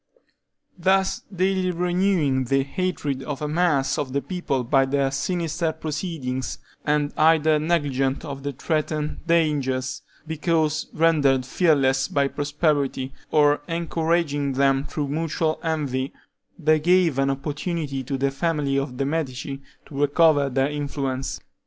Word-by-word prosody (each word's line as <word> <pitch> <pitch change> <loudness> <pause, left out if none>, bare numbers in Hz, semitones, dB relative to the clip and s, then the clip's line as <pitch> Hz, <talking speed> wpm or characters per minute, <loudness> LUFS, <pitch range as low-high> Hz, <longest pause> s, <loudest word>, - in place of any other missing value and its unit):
Thus 190 +2 +2
daily 185 0 +1
renewing 175 -6 +1
the 135 +2 +2
hatred 145 -3 -2
of 145 0 -5
a 150 - -2
mass 150 -4 +1
of 130 -3 -3
the 140 - +1
people 175 -8 -2
by 135 +3 +3
their 135 0 0
sinister 165 +3 -1
proceedings, 150 -6 -4 0.3
and 150 0 +1
either 155 -1 +4
negligent 145 -4 0
of 140 -2 -6
the 145 +1 -3
threatened 155 +2 -2
dangers, 145 -6 +1 0.2
because 155 -1 0
rendered 145 -5 +3
fearless 135 -3 +2
by 140 -1 +1
prosperity, 145 -3 -1 0.2
or 145 -1 +4
encouraging 165 -4 0
them 135 +1 +2
through 145 0 -3
mutual 155 +1 -1
envy, 140 -5 -2 0.4
they 155 -2 +3
gave 170 -3 +3
an 135 0 +2
opportunity 145 +1 -3
to 135 +2 -3
the 135 +1 +1
family 140 -1 0
of 135 -2 -5
the 135 - 0
Medici 140 -2 -3 0.2
to 140 -1 -5
recover 145 -1 +4
their 135 +2 +1
influence. 140 -2 -3
145 Hz, 130 wpm, -24 LUFS, 135-165 Hz, 0.4 s, either